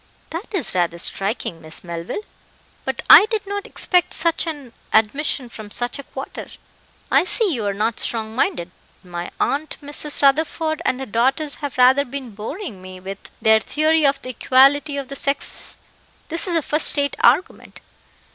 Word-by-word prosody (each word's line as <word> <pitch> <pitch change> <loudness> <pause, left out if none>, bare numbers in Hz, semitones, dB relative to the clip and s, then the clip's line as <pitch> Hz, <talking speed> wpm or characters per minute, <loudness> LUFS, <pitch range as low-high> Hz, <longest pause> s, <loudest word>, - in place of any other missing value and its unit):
"That 335 +6 -6
is 370 - -2
rather 175 -2 0
striking, 195 -2 -2
Miss 155 0 -5
Melville; 170 - -6 0.6
but - - -3
I 425 - +10
did 440 -3 -2
not 405 0 -4
expect 360 -2 +1
such 335 0 +1
an 285 -7 -6 0.2
admission 255 +4 +2
from 215 -3 -10
such 240 +5 -2
a - - -6
quarter. 270 0 -8 0.6
I - - +5
see 390 0 +1
you 225 -6 -2
are 200 - 0
not 215 +2 -1
strong 220 -1 -2
minded 175 -7 -1 0.3
My 175 -1 -6
aunt, 300 +3 -1
Mrs. 290 0 +1
Rutherford, 315 +3 +2
and 255 +1 0
her - - -4
daughters, 265 +6 0
have 285 -3 -5
rather 260 +3 +5
been 265 -2 -7
boring 220 - -7
me 185 0 -10
with 195 +1 -9
their 220 0 +6
theory 310 +6 +1
of 275 -1 +3
the 255 - -6
equality 275 +4 +3
of 275 -2 -4
the 275 - -7
sexes: 280 +1 -3 0.5
this 330 +3 +1
is 350 - 0
a 325 - +1
first 300 +1 +4
rate 285 0 0
argument. 275 +10 +1
275 Hz, 170 wpm, -21 LUFS, 220-310 Hz, 0.6 s, I